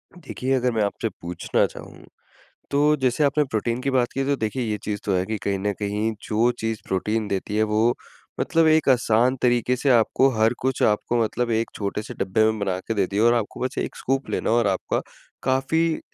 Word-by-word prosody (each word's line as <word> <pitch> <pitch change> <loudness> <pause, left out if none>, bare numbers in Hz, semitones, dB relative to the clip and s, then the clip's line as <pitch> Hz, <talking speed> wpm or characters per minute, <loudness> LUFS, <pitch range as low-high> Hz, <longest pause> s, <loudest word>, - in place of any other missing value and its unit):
देखिए 135 -5 -3
अगर 125 -1 +1
मैं 110 -2 +1
आपसे 105 +2 -2
पूछना 85 0 0
चाहूँ, - - -10 0.7
तो 150 +2 +3
जैसे 130 +3 +2
आपने 150 +2 +2
प्रोटीन 120 -1 -2
की 140 - 0
बात 125 -2 +2
की 135 0 -1
तो 140 - +1
देखिए 110 +3 -2
ये 105 - -1
चीज़ 105 -1 -3
तो 100 - 0
है 90 0 +1
कि 110 +1 -2
कहीं 100 -1 -1
न 100 +2 -1
कहीं 105 +2 -1
जो 115 +3 +2
चीज़ 110 -1 -3
प्रोटीन 105 +3 -1
देती 100 +2 -3
है 110 - +3
वो 110 +3 +3 0.5
मतलब 165 0 +2
एक 155 -2 +3
आसान 125 0 +3
तरीक़े 120 0 +2
से 135 +2 0
आपको 125 +2 +4
हर 110 +2 +4
कुछ 130 -1 0
आपको 115 +2 +2
मतलब 120 +2 -1
एक 115 0 0
छोटे 100 +1 -3
से 120 +3 -8
डब्बे 110 0 +1
में 110 0 +1
बना 95 -3 -1
के 115 - 0
दिया 100 +3 -1
है 115 - +6
और 120 - +4
आपको 115 -3 -3
बस 130 +3 -3
1 - - -3
स्कूप 135 +1 -2
लेना - - -1
है 115 - +3
और 120 - +2
आपका 95 -2 0 0.4
काफ़ी 160 +5 +1
अ, - - -11
115 Hz, 220 wpm, -23 LUFS, 105-130 Hz, 0.7 s, है